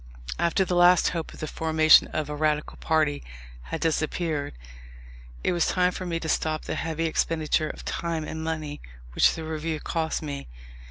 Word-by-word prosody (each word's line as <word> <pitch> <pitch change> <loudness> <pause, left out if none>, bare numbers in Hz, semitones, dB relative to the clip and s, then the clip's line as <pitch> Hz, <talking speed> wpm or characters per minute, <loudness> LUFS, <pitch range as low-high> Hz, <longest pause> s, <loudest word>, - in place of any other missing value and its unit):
After 170 +3 +2
the 180 - -2
last 175 0 +6
hope 165 -2 -4
of - - -12
the - - -1
formation 160 0 +5
of 155 -2 -3
a 150 - -4
Radical 150 0 0
party 155 -2 +1 0.4
had 60 - -5
disappeared, 155 - -1 0.9
it - - +2
was 175 -2 +1
time 180 -1 +2
for 185 0 -6
me 165 -1 -1
to 160 - -4
stop 155 0 0
the - - -3
heavy 165 0 -2
expenditure 155 -1 0
of - - -9
time 165 -2 -2
and 160 +1 -5
money 155 -2 -4 0.3
which - - +4
the 160 - -6
Review 160 0 -3
cost 160 0 -2
me. 140 -2 -5
160 Hz, 175 wpm, -26 LUFS, 155-165 Hz, 0.9 s, last